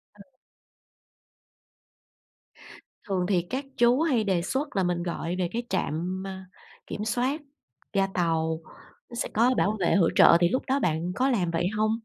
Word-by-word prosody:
Ừ. 205 - -14 2.8
Thường 185 -3 0
thì 185 -3 +3
các 265 +2 -3
chú 240 +4 +4
hay 270 -9 +2
đề 190 -4 +1
xuất 265 - -3
là 190 - +2
mình 175 -1 -1
gọi 170 0 -3
về 180 -2 0
cái 235 +1 -2
trạm, 185 +1 -2
ờ, 195 - -5 0.6
kiểm 210 - -4
soát 255 +7 0 0.5
ga 195 -1 +2
tàu, 160 -2 0 0.5
nó 240 - -9
sẽ 240 - -2
có 235 +4 +4
bảo 215 +1 +1
vệ 175 - +2
hỗ 175 -5 +4
trợ - - +7
thì 175 - +4
lúc 255 - -1
đó 270 +1 +1
bạn 170 - -1
có 260 +2 +2
làm 185 -10 +1
vậy 170 +1 0
hông? 215 0 +2
195 Hz, 170 wpm, -26 LUFS, 175-240 Hz, 2.8 s, trợ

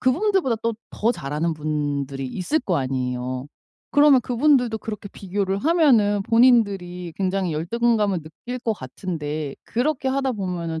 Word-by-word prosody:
그분들보다 335 - +2 0.3
더 230 +3 +1
잘하는 150 - -2
분들이 145 -3 -2
있을 185 - -1
거 180 -9 0
아니에요. 130 -1 -2 0.5
그러면 290 -2 +6
그분들도 245 -1 +2
그렇게 210 -2 -6
비교를 195 0 -2
하면은 240 - +3
본인들이 200 -8 +3
굉장히 190 -2 0
열등감을 210 +3 +1
느낄 200 +11 -7
것 230 -2 -1
같은데 150 -3 -5
그렇게 265 +2 -1
하다 270 0 0
보면은 175 -6 -3
195 Hz, 335 characters per minute, -23 LUFS, 155-245 Hz, 0.5 s, 그러면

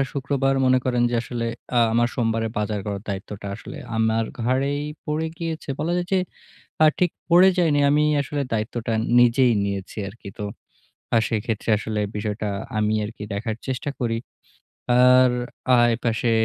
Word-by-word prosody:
আর 135 - +1
শুক্রবার 135 -1 0
মনে 130 0 +5
করেন 125 -1 +1
যে - - -1
আসলে 120 -1 -4 0.3
আ - - +6
আমার 120 +1 +3
সোমবারে 115 -2 0
বাজার 105 -1 -1
করার 100 -1 -3
দায়িত্বটা 100 +1 -5
আসলে 125 - -10 0.2
আমার 110 0 +2 0.2
ঘাড়েই 135 +4 0 0.2
পড়ে 155 +1 -1
গিয়েছে। 165 -3 -4
বলা 170 +3 -1
যায় 175 0 -1
যে 190 - +4 0.7
আ - - +8
ঠিক 180 -2 +3 0.2
পড়ে 180 +2 +7
যাইনি। 155 -5 +3
আমি 150 +1 +3 0.2
আসলে 145 0 -3
দায়িত্বটা 115 +1 -2 0.3
নিজেই 120 +1 +5
নিয়েছি 100 -1 -4
আরকি। 100 0 -11
তো 105 - -3 0.7
আ - - +7
সেইক্ষেত্রে 115 0 -2
আসলে 110 -1 -3 0.2
বিষয়টা 105 0 -3 0.3
আমি 105 0 +1
আরকি 105 0 -8
দেখার 110 +2 -3
চেষ্টা 130 +2 -3
করি। 115 -2 0 0.8
আর 125 0 +6 0.5
আ - - +4 0.2
এপাশে 115 0 0
120 Hz, 155 wpm, -23 LUFS, 110-140 Hz, 0.8 s, আ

